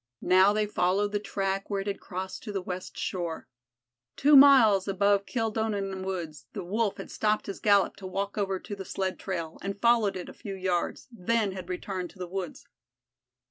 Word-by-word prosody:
Now 185 Hz, +2 st, +6 dB
they 215 Hz, 0 st, +1 dB
followed 205 Hz, 0 st, +1 dB
the 205 Hz, -, 0 dB
track 195 Hz, -1 st, -2 dB
where 200 Hz, -1 st, -1 dB
it -, -, -7 dB
had 200 Hz, -1 st, -3 dB
crossed 185 Hz, 0 st, -6 dB
to 215 Hz, -, -6 dB
the 200 Hz, -, -2 dB
west 180 Hz, 0 st, -6 dB
shore. 170 Hz, -3 st, -3 dB, 0.7 s
Two 290 Hz, +2 st, +5 dB
miles 250 Hz, -9 st, +7 dB
above 200 Hz, 0 st, +2 dB
Kildonan 215 Hz, -5 st, -2 dB
woods 165 Hz, -8 st, -5 dB
the -, -, -5 dB
Wolf 205 Hz, +3 st, -1 dB
had -, -, -8 dB
stopped 215 Hz, 0 st, 0 dB
his 200 Hz, -, -6 dB
gallop 200 Hz, -3 st, +3 dB
to 190 Hz, -, -7 dB
walk 195 Hz, +2 st, -3 dB
over 195 Hz, -2 st, -1 dB
to 205 Hz, -, -7 dB
the 195 Hz, -, -7 dB
sled 190 Hz, 0 st, -3 dB
trail, 170 Hz, -4 st, -4 dB
had 200 Hz, +1 st, -4 dB
followed 230 Hz, -4 st, +3 dB
it 180 Hz, -, -7 dB
a -, -, -9 dB
few 200 Hz, -2 st, -7 dB
yards, 185 Hz, -2 st, -2 dB
then 225 Hz, -1 st, 0 dB
had 185 Hz, -1 st, -8 dB
returned 180 Hz, 0 st, -4 dB
to -, -, -18 dB
the 185 Hz, -, -4 dB
woods. 185 Hz, -1 st, -6 dB
195 Hz, 190 wpm, -28 LUFS, 185-210 Hz, 0.7 s, miles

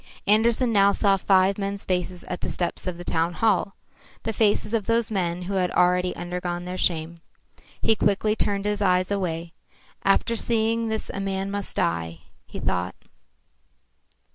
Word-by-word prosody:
Andersen 230 Hz, +3 st, +3 dB
now 200 Hz, -1 st, +5 dB
saw 200 Hz, -2 st, +3 dB
five 190 Hz, +1 st, +3 dB
men's 200 Hz, 0 st, -3 dB
faces 180 Hz, -1 st, -2 dB
at 180 Hz, -, -6 dB
the -, -, -3 dB
steps 175 Hz, +1 st, -3 dB
of 180 Hz, -2 st, -3 dB
the 175 Hz, -, -8 dB
town 165 Hz, 0 st, 0 dB
hall, 205 Hz, -1 st, +1 dB, 0.5 s
the 225 Hz, -, -2 dB
faces 210 Hz, 0 st, +1 dB
of 220 Hz, -3 st, 0 dB
those 230 Hz, -1 st, +1 dB
men 180 Hz, -3 st, -1 dB
who 195 Hz, +3 st, -4 dB
had 185 Hz, -2 st, +1 dB
already 180 Hz, +1 st, +2 dB
undergone 175 Hz, 0 st, -4 dB
their 180 Hz, 0 st, -5 dB
shame. 170 Hz, -2 st, -1 dB, 0.6 s
He 220 Hz, -, +4 dB
quickly 210 Hz, +1 st, +1 dB
turned 200 Hz, -2 st, -1 dB
his 210 Hz, 0 st, -1 dB
eyes 185 Hz, -1 st, +2 dB
away. 170 Hz, -4 st, -2 dB, 0.5 s
After 195 Hz, +4 st, +2 dB
seeing 230 Hz, 0 st, +1 dB
this 220 Hz, 0 st, -3 dB
a -, -, -4 dB
man 195 Hz, 0 st, -2 dB
must 200 Hz, -1 st, -1 dB
die, 85 Hz, 0 st, -1 dB, 0.3 s
he -, -, -8 dB
thought. -, -, -2 dB
195 Hz, 165 wpm, -24 LUFS, 180-210 Hz, 0.6 s, now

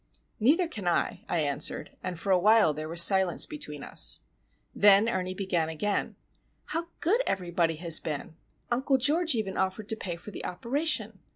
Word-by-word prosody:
"Neither 310 Hz, -, +3 dB
can 210 Hz, -, -7 dB
I," 175 Hz, -, -1 dB
I 170 Hz, -, 0 dB
answered, 145 Hz, -2 st, -1 dB
and 180 Hz, -2 st, -6 dB
for 195 Hz, -, -2 dB
a 185 Hz, -, +4 dB
while 210 Hz, -4 st, +4 dB
there 155 Hz, +1 st, -6 dB
was 170 Hz, +1 st, +6 dB
silence 190 Hz, -2 st, +4 dB
between 150 Hz, -, -8 dB
us. -, -, +2 dB, 0.5 s
Then 205 Hz, +1 st, +5 dB
Ernie 185 Hz, -4 st, -3 dB
began 180 Hz, -5 st, -1 dB
again:—"How 210 Hz, -, -5 dB
good 425 Hz, +9 st, +2 dB
everybody 175 Hz, -3 st, -1 dB
has 165 Hz, 0 st, +4 dB
been! 155 Hz, 0 st, -6 dB, 0.4 s
Uncle 265 Hz, +3 st, +1 dB
George 305 Hz, +4 st, +1 dB
even 205 Hz, -4 st, -3 dB
offered 190 Hz, +3 st, -3 dB
to 220 Hz, -, 0 dB
pay 180 Hz, -5 st, -5 dB
for 175 Hz, +5 st, -11 dB
the -, -, -8 dB
operation. 235 Hz, -, -1 dB
190 Hz, 165 wpm, -27 LUFS, 170-235 Hz, 0.5 s, was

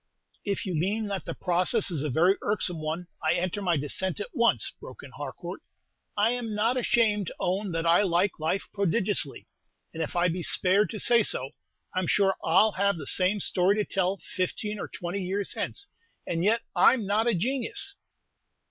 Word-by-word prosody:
"If 200 Hz, +2 st, -2 dB
you 185 Hz, -, -3 dB
mean 200 Hz, +7 st, 0 dB
that 195 Hz, -5 st, -4 dB
the -, -, -5 dB
process 180 Hz, +4 st, +2 dB
is 155 Hz, -5 st, -1 dB
a 150 Hz, -, -1 dB
very 175 Hz, +8 st, +3 dB
irksome 180 Hz, -5 st, -1 dB
one, 160 Hz, +3 st, -3 dB, 0.2 s
I 155 Hz, +1 st, +2 dB
enter 185 Hz, +3 st, -2 dB
my 175 Hz, -4 st, +1 dB
dissent 165 Hz, +7 st, -2 dB
at 205 Hz, -, -5 dB
once," 235 Hz, 0 st, +2 dB
broke -, -, -11 dB
in -, -, -11 dB
Harcourt. -, -, -7 dB, 0.6 s
"I 215 Hz, +3 st, +3 dB
'm 230 Hz, -3 st, -4 dB
not 225 Hz, +4 st, +2 dB
ashamed 220 Hz, -5 st, +2 dB
to -, -, -6 dB
own 190 Hz, +2 st, -1 dB
that 165 Hz, 0 st, -1 dB
I 170 Hz, +3 st, +5 dB
like 185 Hz, -1 st, +1 dB
life 160 Hz, +5 st, -1 dB
prodigiously; 200 Hz, -6 st, 0 dB, 0.5 s
and 165 Hz, -, -5 dB
if 160 Hz, -, -3 dB
I 175 Hz, +1 st, +3 dB
be 175 Hz, +1 st, -2 dB
spared 190 Hz, +4 st, +2 dB
to 215 Hz, -, -5 dB
say 235 Hz, +2 st, +5 dB
so, 135 Hz, -9 st, 0 dB, 0.4 s
I -, -, 0 dB
'm 185 Hz, -, -2 dB
sure 195 Hz, -2 st, +3 dB
I 175 Hz, +5 st, +5 dB
'll 220 Hz, -, +3 dB
have 200 Hz, -1 st, +1 dB
the 150 Hz, -, -7 dB
same 185 Hz, +7 st, +1 dB
story 185 Hz, +1 st, +2 dB
to 210 Hz, -1 st, 0 dB
tell 190 Hz, 0 st, 0 dB
fifteen 205 Hz, +3 st, -3 dB
or -, -, -4 dB
twenty 175 Hz, +3 st, -5 dB
years 195 Hz, +2 st, -2 dB
hence; 400 Hz, -, -3 dB, 0.4 s
and 165 Hz, 0 st, -2 dB
yet 225 Hz, +4 st, +2 dB
I -, -, +6 dB
'm 230 Hz, -5 st, -4 dB
not 210 Hz, +4 st, +1 dB
a 235 Hz, -, +3 dB
genius!" 275 Hz, -, 0 dB
195 Hz, 200 wpm, -27 LUFS, 175-210 Hz, 0.6 s, I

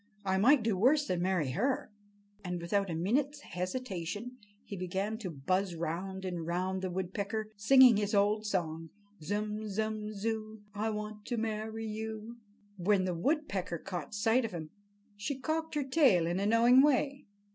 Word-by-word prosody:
I 190 Hz, 0 st, +1 dB
might 255 Hz, +4 st, +5 dB
do 220 Hz, -3 st, +1 dB
worse 275 Hz, +10 st, +4 dB
than 180 Hz, -7 st, -1 dB
marry 180 Hz, -7 st, +1 dB
her." 250 Hz, -, -1 dB, 0.5 s
And 180 Hz, -1 st, -3 dB
without 195 Hz, +3 st, 0 dB
a 165 Hz, -, -2 dB
minute's 275 Hz, -, 0 dB
hesitation 205 Hz, -, -4 dB, 0.3 s
he 200 Hz, -, -7 dB
began 195 Hz, +4 st, -2 dB
to 200 Hz, -5 st, -4 dB
buzz 175 Hz, +5 st, -1 dB
round 180 Hz, +4 st, -4 dB
and 175 Hz, -3 st, -3 dB
round 185 Hz, +3 st, -1 dB
the 190 Hz, -, -2 dB
woodpecker, 200 Hz, +4 st, -3 dB
singing 245 Hz, +2 st, +7 dB
his 210 Hz, 0 st, 0 dB
old 210 Hz, +2 st, +2 dB
song: 165 Hz, -4 st, -2 dB, 0.3 s
"Zum, 210 Hz, +4 st, -2 dB
zum, 215 Hz, +1 st, -2 dB
zoo, 215 Hz, 0 st, -4 dB
I 210 Hz, +2 st, -1 dB
want 210 Hz, 0 st, -5 dB
to 240 Hz, -, -2 dB
marry 220 Hz, 0 st, -3 dB
you!" 220 Hz, +1 st, -5 dB, 0.4 s
When 190 Hz, +1 st, +2 dB
the 180 Hz, -, -1 dB
woodpecker 190 Hz, -, -1 dB
caught 175 Hz, 0 st, -6 dB
sight 225 Hz, +5 st, +3 dB
of 225 Hz, -, -4 dB
him, 160 Hz, -3 st, -6 dB, 0.4 s
she 215 Hz, +7 st, -3 dB
cocked 320 Hz, +3 st, -2 dB
her 295 Hz, -, +1 dB
tail 260 Hz, -, +4 dB
in 175 Hz, +2 st, -1 dB
a 200 Hz, -, +1 dB
knowing 235 Hz, +4 st, +6 dB
way. 280 Hz, 0 st, +1 dB
210 Hz, 165 wpm, -32 LUFS, 185-225 Hz, 0.5 s, singing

